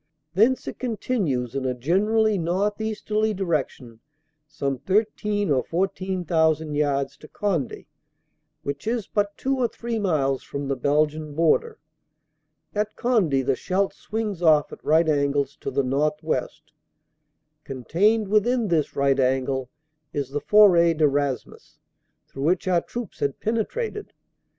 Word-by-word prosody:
Thence 225 +8 +3
it - - -6
con 240 -4 -3
tinues 140 - -1
in 135 -1 -2
a 130 -1 -1
generally 210 - +2
northeasterly 210 +4 -1
direction 140 - -3 0.5
some 140 -3 -3
thirteen 205 - 0
or 130 -2 +2
fourteen 185 +1 -2
thousand 160 -2 +1
yards 140 -2 0
to 155 - -13
Conde, 175 - -2 0.8
which 140 +7 -5
is 230 -3 -1
but 205 -1 -1
two 270 0 -1
or 245 - +3
three 230 -1 -4
miles 145 -9 +1
from 140 0 -5
the 135 - 0
Belgian 150 +3 0
border. 435 - +2 1.0
At 210 +1 -2
Conde 180 - +1
the 135 - +2
Scheldt 190 +7 -1
swings 210 -5 -4
off 155 -3 +4
at - - -12
right 160 +2 +3
angles 140 -1 +1
to - - -5
the 140 +1 0
northwest. 150 +4 -2 0.9
Contained 195 - +1
within 215 +2 +2
this 160 -4 0
right 140 -1 +2
angle 130 0 0 0.4
is 140 -2 -3
the 145 +1 -2
Foret 175 -6 +5
de 155 - +4
Raismes, 140 -2 -3 0.5
through 135 +1 -5
which 180 +3 +1
our 175 -2 +3
troops 240 -5 -7
had 140 -1 -1
penetrated. 415 - -3
165 Hz, 135 wpm, -24 LUFS, 140-210 Hz, 1.0 s, Foret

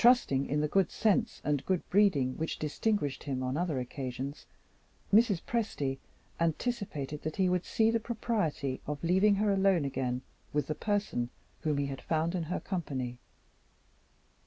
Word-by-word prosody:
Trusting 235 - +5
in 150 +1 +1
the 150 - +2
good 195 +4 +3
sense 220 +2 +1
and 145 -2 0
good 185 -2 0
breeding 170 -11 +4
which 160 0 -2
distinguished 150 -2 -1
him 130 -3 -2
on 130 +1 -1
other 160 -4 0
occasions, 130 +2 -5 0.7
Mrs. 210 -5 +5
Presty 145 - -1 0.4
anticipated 165 - -1
that 155 0 -3
he 190 -1 +3
would 180 0 +1
see 225 0 +3
the 230 - +2
propriety 210 - -1
of 150 +1 -4
leaving 190 +4 +4
her 205 0 +2
alone 190 -5 +3
again 130 -2 -2 0.3
with 150 0 +1
the 155 - -1
person 205 - -1 0.3
whom 150 -2 0
he 140 - +1
had 135 -1 -5
found 165 +1 0
in 175 -3 -1
her 175 - -2
company. 130 -10 -3
160 Hz, 160 wpm, -31 LUFS, 140-200 Hz, 0.7 s, Trusting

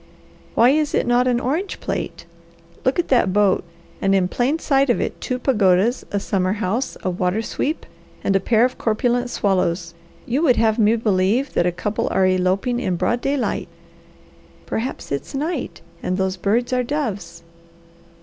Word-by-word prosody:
Why 240 +3 +6
is 300 0 +1
it - - +1
not 245 +1 +3
an 245 -1 +2
orange 310 +11 -2
plate? - - -4 0.6
Look 260 - +1
at 350 - 0
that 240 -7 +3
boat! 200 -1 +3 0.4
And 195 0 +3
in 185 -2 +2
plain 255 +9 0
sight 275 -4 +2
of 240 - +2
it, - - -3
two 255 - -2
pagodas, 215 -2 +2
a 205 - 0
summer 190 -1 0
house, 220 +5 -2
a 185 - 0
water 180 +4 -1
sweep, 300 +7 -2 0.4
and 195 - +1
a - - +5
pair 230 +3 +3
of 255 - -3
corpulent 245 +2 0
swallows; 180 -5 0 0.3
you 255 +5 0
would 270 -7 +4
have 225 0 +2
me 220 +1 +4
believe 220 +4 +1
that 175 - +2
a - - +2
couple 210 +4 -2
are 190 - +2
eloping 185 +6 +1
in 185 -8 -1
broad 240 +7 0
daylight." 275 -1 -1 1.0
"Perhaps 240 +4 -4
it's 140 - -4
night! 310 +6 -3 0.2
And 185 - -1
those 190 -1 0
birds 230 +7 0
are 250 - +2
doves." 220 - -4
225 Hz, 170 wpm, -21 LUFS, 190-255 Hz, 1.0 s, Why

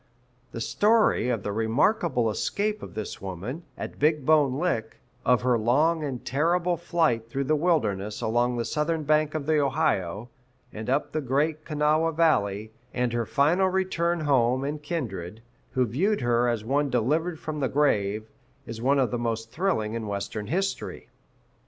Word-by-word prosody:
The 115 - -6
story 210 - +3
of 115 -5 -1
the 105 - -2
remarkable 120 - +1
escape 210 - -1
of - - -9
this 110 -1 -5
woman, 100 - -5 0.2
at - - -7
Big 150 -1 +2
Bone 150 -4 +4
Lick, 140 -9 -1 0.3
of 125 -1 +3
her 125 -2 +3
long 150 +8 +2
and 135 -4 -5
terrible 170 +6 +1
flight 160 -9 0
through 135 +3 -2
the 155 +3 +2
wilderness 110 - 0
along 120 +2 +1
the 115 - -1
southern 155 +1 -1
bank 155 +1 +2
of 150 -3 -2
the 155 0 +2
Ohio 120 - 0 0.4
and 110 +2 -6
up 135 +3 0
the 155 - -1
Great 150 +4 0
Kanawha 155 +1 +1
Valley, 110 -10 +1 0.2
and 125 -1 0
her 120 -1 -1
final 160 +7 +3
return 180 -2 0
to 155 - -4
home 130 -2 +2
and 145 +2 -3
kindred, 115 - -5 0.3
who 130 -1 +2
viewed 180 - 0
her 120 0 +2
as 115 -3 -1
one 140 +3 +1
delivered 155 +8 0
from 155 -1 -5
the 135 - 0
grave, 110 -7 +1 0.4
is 115 -2 -7
one 135 +3 +3
of 130 -3 +2
the 120 - -1
most 115 -1 -3
thrilling 160 - -1
in 115 -2 -4
Western 100 +1 -4
history. 195 +4 -3
135 Hz, 170 wpm, -26 LUFS, 115-160 Hz, 0.4 s, Bone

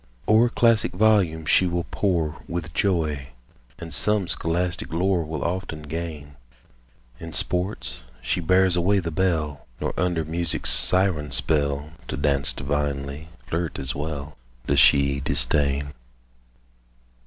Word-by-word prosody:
O'er 110 +3 +5
classic 115 -2 +2
volumes 90 -6 +2
she 95 - +5
will 85 0 -1
pore 85 -6 0
With 85 -3 -5
joy; 80 -9 0 0.5
and 85 -2 -8
true 105 -2 +1
scholastic 90 +2 -2
lore 90 +1 +1
Will 75 -2 -4
often 85 -3 -3
gain. 75 -2 -6 0.8
In 80 -1 -8
sports 90 - -2 0.2
she - - -1
bears 95 +1 +3
away 90 +3 +2
the 85 -3 -2
bell, 80 -5 -1
Nor, - - -2
under 90 -3 0
music's 85 +1 +1
siren 90 -6 +3
spell, 70 +2 0 0.2
To 65 - -4
dance 70 -2 +1
divinely, 70 +1 -3 0.2
flirt 85 -1 -3
as 65 0 -3
well, 75 0 -5 0.3
Does - - +2
she 70 0 +5
disdain. 70 0 +1
80 Hz, 125 wpm, -24 LUFS, 75-90 Hz, 0.8 s, O'er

